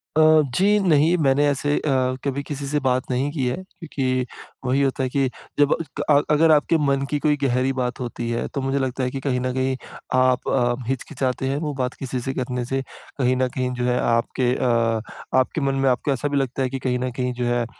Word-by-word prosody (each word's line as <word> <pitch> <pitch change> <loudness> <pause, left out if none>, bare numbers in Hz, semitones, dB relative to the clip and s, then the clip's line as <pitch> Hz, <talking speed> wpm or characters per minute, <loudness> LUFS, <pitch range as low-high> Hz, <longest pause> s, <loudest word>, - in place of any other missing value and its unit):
अ, 155 0 +6
जी। 205 +2 +4
नहीं, 165 -2 +4
मैंने 145 -1 +3
ऐसे 145 +1 0
अ, 130 -3 +1
कभी 140 0 -1
किसी 140 -1 -5
से 150 +1 0
बात 130 0 0
नहीं 130 +3 0
की 140 -5 -2
है 125 - 0
क्योंकि 145 -9 -3 0.4
वही 130 +2 +2
होता 135 -1 0
है 130 - 0
कि 135 0 +1 0.3
जब 145 0 +5
अ, - - +2 0.2
क - - 0
अ, 145 -1 +6
अगर 160 +2 +5
आपके 155 +2 +4
मन 140 0 +1
की 145 - 0
कोई 150 0 +2
गहरी 130 +1 +1
बात 125 0 -2
होती 120 -1 -4
है, 120 - -1
तो 140 - -4
मुझे 135 +1 0
लगता 130 0 -2
है 125 - 0
कि 135 - -4
कहीं 130 -2 -1
न 130 0 -1
कहीं 130 0 0 0.4
आप 130 -1 +2
अ, 120 -2 +2
हिचकिचाते 130 0 -2
हैं, 135 - 0
वो 150 -1 -2
बात 130 -1 -2
किसी 130 -1 -3
से 135 +2 -3
करने 125 -2 -3
से। 135 +2 -1 0.4
कहीं 130 -1 +2
न 130 0 +2
कहीं 125 0 -2
जो 125 - -3
है, 125 0 +1
आपके 120 +2 +1
अ - - -1 0.7
आपके 130 +4 0
मन 135 0 +1
में 135 0 +2
आपको 125 +3 0
ऐसा 135 +2 -1
भी 145 -1 -1
लगता 135 0 -1
है 130 - 0
कि 135 +1 -4
कहीं 125 -1 0
न 125 0 -2
कहीं 125 0 -2
जो 125 0 -2
है, 120 0 +1
135 Hz, 235 wpm, -23 LUFS, 125-145 Hz, 0.7 s, अ